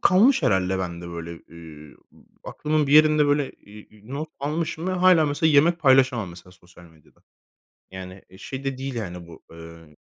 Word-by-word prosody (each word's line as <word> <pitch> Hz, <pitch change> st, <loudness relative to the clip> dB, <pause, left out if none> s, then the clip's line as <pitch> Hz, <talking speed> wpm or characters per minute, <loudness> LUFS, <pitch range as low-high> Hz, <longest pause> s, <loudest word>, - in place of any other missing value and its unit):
kalmış 205 Hz, -, +4 dB
herhâlde 95 Hz, -5 st, +1 dB
bende 85 Hz, -1 st, -6 dB
böyle, 85 Hz, 0 st, -7 dB
eee, 80 Hz, -3 st, -14 dB, 0.2 s
u -, -, -24 dB, 0.3 s
aklımın 150 Hz, -1 st, -1 dB
bir 140 Hz, -, -1 dB
yerinde 155 Hz, -1 st, +5 dB
böyle, 145 Hz, -1 st, 0 dB
eee, 105 Hz, +1 st, -17 dB
e 105 Hz, +3 st, -20 dB
not 155 Hz, +2 st, -5 dB
almışım 160 Hz, +3 st, -3 dB
ve 185 Hz, -, -1 dB
hâlâ 180 Hz, -4 st, +4 dB
mesela 145 Hz, +2 st, +1 dB
yemek 160 Hz, +4 st, +4 dB
paylaşamam 130 Hz, -, +3 dB
mesela 90 Hz, +1 st, -14 dB
sosyal 90 Hz, -1 st, -19 dB
medyada. 80 Hz, -3 st, -23 dB, 0.7 s
Yani 95 Hz, 0 st, -10 dB, 0.2 s
şey 135 Hz, +5 st, -8 dB
de 135 Hz, -1 st, -3 dB
değil 135 Hz, -1 st, -5 dB
yani 90 Hz, -6 st, -6 dB
bu 80 Hz, -, -14 dB
emm 80 Hz, -2 st, -14 dB
120 Hz, 170 wpm, -23 LUFS, -, 0.7 s, yerinde